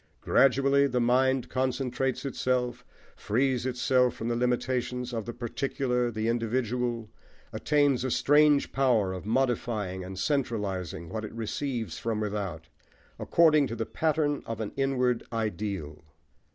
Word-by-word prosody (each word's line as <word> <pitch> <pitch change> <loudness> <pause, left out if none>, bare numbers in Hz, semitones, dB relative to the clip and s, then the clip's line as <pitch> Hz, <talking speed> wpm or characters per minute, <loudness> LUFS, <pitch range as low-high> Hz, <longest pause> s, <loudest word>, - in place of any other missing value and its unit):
Gradually 140 +1 +4
the 125 -2 0
mind 130 +2 +2
concentrates 130 0 -1
itself, 125 -2 -1 0.3
frees 130 +2 0
itself 125 0 +2
from 115 - -4
the 120 - 0
limitations 125 0 -1
of 115 -2 -4
the - - -2
particular, 125 +1 -1
the 110 -1 -2
individual, 120 0 -1 0.4
attains 145 -4 +2
a 130 - -1
strange 145 +2 +4
power 120 -8 +2
of 95 +2 -7
modifying 110 -6 -1
and 95 +1 -8
centralising 100 - -2
what 110 -1 -4
it 110 - -6
receives 115 - -3
from 115 -2 -2
without, 100 -6 -4 0.5
according 155 -4 +4
to 115 - -5
the 115 - -2
pattern 155 -2 0
of 115 -1 -4
an 110 -2 -3
inward 125 -3 +1
ideal. 100 -8 -3
125 Hz, 130 wpm, -28 LUFS, 110-130 Hz, 0.5 s, Gradually